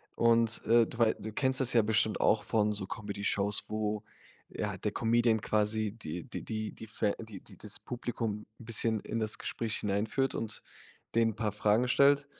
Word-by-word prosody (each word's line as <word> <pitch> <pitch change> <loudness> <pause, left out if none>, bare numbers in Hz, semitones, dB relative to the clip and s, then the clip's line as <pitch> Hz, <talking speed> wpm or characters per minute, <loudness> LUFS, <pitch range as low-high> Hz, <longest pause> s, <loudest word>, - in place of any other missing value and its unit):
Und, 115 -1 +3
äh, 115 0 +5
du - - -10
wei 115 -2 +4
du 110 - -7
kennst 130 +2 +2
das 130 -2 +4
ja 115 - +6
bestimmt 110 0 +1
auch 105 - +3
von 105 -1 +1
so 100 -2 -4
Comdeyshows, 100 0 -1
wo 105 -1 -2 0.4
ja, 100 -2 -4
der 105 +3 -2
Comedian 115 0 +2
quasi 110 0 +1
die 90 -6 -6
die - - -7
die 110 -1 -3
die - - -10
die - - -16
fä 105 -1 -1
die 110 -4 -8
die - - -15
das - - -5
Publikum 115 -3 -4
'n 115 - -11
bisschen 115 -1 +2
in 115 - -3
das 110 -1 +2
Gespräch 115 -1 -2
hineinführt 105 +6 0
und 110 -2 -3 0.5
denen 115 -1 +4
'n - - -12
paar 110 -1 -1
Fragen 105 +3 +2
stellt. 140 +2 +4
110 Hz, 195 wpm, -31 LUFS, 105-115 Hz, 0.5 s, ja